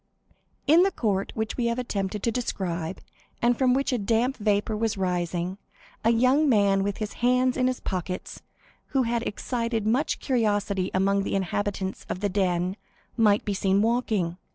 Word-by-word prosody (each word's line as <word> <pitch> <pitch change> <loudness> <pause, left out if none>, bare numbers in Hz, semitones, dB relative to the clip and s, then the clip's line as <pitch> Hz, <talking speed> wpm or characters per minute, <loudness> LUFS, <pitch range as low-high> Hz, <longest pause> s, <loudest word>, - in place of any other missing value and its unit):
In 315 +4 +6
the 385 - +4
court 205 - -1
which 220 -1 -3
we 240 -2 +1
have 235 +1 0
attempted 205 -5 -3
to 230 - +1
describe, 185 -7 -3 0.4
and 240 +1 +3
from 255 0 +3
which 275 0 0
a 245 - +1
damp 230 +5 +1
vapor 210 0 0
was 225 -1 -1
rising, 180 0 -2 0.4
a 225 - +4
young 255 +6 +4
man 200 -4 +4
with 200 0 -2
his 215 -1 -4
hands 250 +1 +3
in 255 -1 +2
his 255 -1 -1
pockets, 185 -1 -4 0.6
who 260 - +4
had 235 0 0
excited 230 -1 -2
much 250 +8 +1
curiosity 205 -6 0
among 195 +1 +2
the 195 - -2
inhabitants 195 0 -2
of - - -3
the 205 +1 0
"Den," 185 -1 0 0.4
might 210 -3 +3
be 205 - -1
seen 195 +1 +2
walking. 220 -7 0
210 Hz, 170 wpm, -26 LUFS, 195-240 Hz, 0.6 s, In